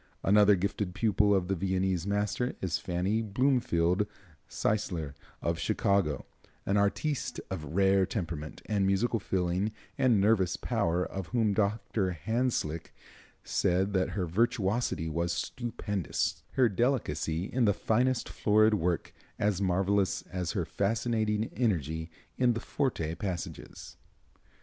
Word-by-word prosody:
Another 105 +1 +6
gifted 100 0 -2
pupil 105 -1 +3
of 90 -2 0
the 95 - 0
Viennese 95 0 0
master 105 +5 -1
is 90 -3 -1
Fannie 95 +5 0
Bloomfield 105 -5 +1 0.4
Zeisler, 85 -9 -1 0.3
of 85 0 0
Chicago, 100 - +1 0.4
an 100 - +1
artiste 105 +8 0
of 80 -4 -5
rare 95 -1 +4
temperament, 85 -7 -5
musical 100 +3 +1
feeling 95 +1 0 0.3
and 125 -5 +4
nervous 100 -3 +3
power, 85 +2 0
of 95 -3 -5
whom 115 -4 +1
Dr. 100 -2 0
Hanslick 100 - -2 0.5
said 95 +3 +1
that 95 -1 +1
her 90 - 0
virtuosity 105 -1 0
was 85 +2 -1
stupendous, 105 - -2
her 130 -2 +4
delicacy 95 - 0
in 120 +5 0
the 105 - +5
finest 125 +4 +1
florid 110 +1 +3
work 90 -4 -1 0.2
as 100 -2 0
marvelous 95 +1 +1
as 90 -2 -2
her - - -1
fascinating 110 0 0
energy 80 - -1 0.3
in 125 -2 +4
the 115 - -3
forte 115 - -1
passages. 90 0 -6
100 Hz, 120 wpm, -30 LUFS, 90-110 Hz, 0.5 s, Another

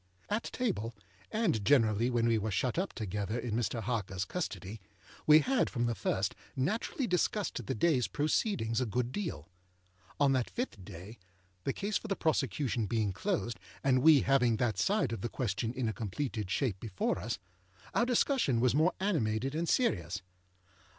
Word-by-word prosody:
At 210 +3 -1
table, 120 - -2 0.4
and 205 - +1
generally 115 -1 +4
when 120 -2 +1
we 115 -1 +3
were 110 +1 -2
shut 125 - 0
up 195 - -2
together 105 0 -3
in 120 -2 -3
Mr. 115 0 -1
Harkerâs 100 -4 -2
custody, 110 - -4 0.5
we 155 +1 +8
had 260 - +2
from 120 -3 -1
the 120 - +1
first 105 - -1 0.2
naturally 215 - -1
discussed 180 - 0
the - - -3
dayâs 130 0 +2
proceedings 145 - 0
a 125 - 0
good 120 +3 -1
deal. 160 - -4 0.7
On 140 -1 +4
that 130 -3 +1
fifth 235 - -4
day, 95 +6 -10 0.5
the - - +2
case 205 0 -1
for - - -8
the 195 - 0
prosecution 130 - 0
being 110 -2 0
closed, 120 - -2 0.2
and 130 -2 +3
we 155 -2 +7
having 125 -4 +3
that 120 -2 0
side 200 - +2
of 115 - -4
the 120 - -2
question 115 -1 -2
in 125 -1 -2
a 110 - -1
completed 110 -1 -3
shape 105 -2 0
before 95 -3 -1
us, 110 +6 -3 0.6
our 235 - +2
discussion 245 - +2
was 125 0 +3
more 160 +6 +3
animated 135 - 0
and 165 +2 -1
serious. 95 - +1
120 Hz, 170 wpm, -32 LUFS, 110-160 Hz, 0.7 s, we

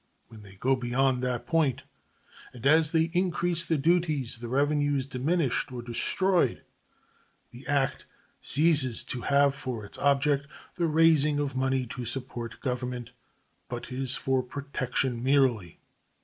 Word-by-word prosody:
When 110 -2 -13
they 100 -2 -14
go 130 +7 +1
beyond 125 +1 0
that 125 -1 -2
point, 160 -7 +1 0.7
and 125 0 -11
as 155 +2 +5
they 165 0 +1
increase 175 -2 +1
the 160 - +1
duties, 150 -6 0
the 120 - -6
revenue 145 +3 +1
is 135 -2 -1
diminished 140 +1 -1
or 120 -1 -6
destroyed; 165 +6 0 0.9
the 120 +3 -12
act 140 -1 0 0.3
ceases 145 -5 +3
to 125 - -4
have 140 +1 +3
for 125 -6 -6
its 100 - -7
object 140 0 +2 0.3
the 170 -2 0
raising 155 -2 +4
of 145 -2 -2
money 130 0 0
to 120 +1 -7
support 120 -2 -4
Government, 125 -2 -4 0.6
but 120 0 -6
is 130 0 0
for 130 -1 0
protection 130 -2 -3
merely. 125 - +1
135 Hz, 140 wpm, -28 LUFS, 125-150 Hz, 0.9 s, as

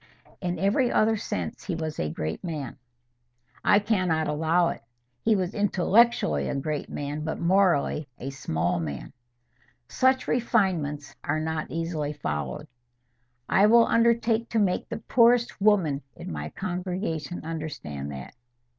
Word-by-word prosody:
"In 180 -1 -2
every 220 +6 +2
other 220 +1 +3
sense 210 0 -4
he 185 - -2
was 160 -2 -4
a 75 - -1
great 80 +1 -4
man." 150 -8 -5 0.9
"I - - +5
cannot 185 -7 +1
allow 160 +3 +2
it. - - -6 0.4
He 220 -1 +3
was 185 -1 -1
intellectually 210 +3 +3
a - - -2
great 145 +1 -3
man, 145 +1 -4
but 160 - -3
morally 170 -5 +2
a 135 - -5
small 85 -11 -1
man." 75 -4 -5 0.7
"Such 260 - +2
refinements 185 -12 0
are 155 +2 0
not 160 0 -3
easily 165 -3 -2
followed." 75 - -4 0.8
"I 200 +2 +5
will 230 +1 +6
undertake 230 0 +2
to 230 - -1
make 200 -4 +1
the - - -3
poorest 240 -2 +4
woman 185 -9 +3
in - - -7
my 75 -1 -4
congregation 180 - -4
understand 145 - -5
that." 65 -2 -8
170 Hz, 135 wpm, -26 LUFS, 145-210 Hz, 0.9 s, will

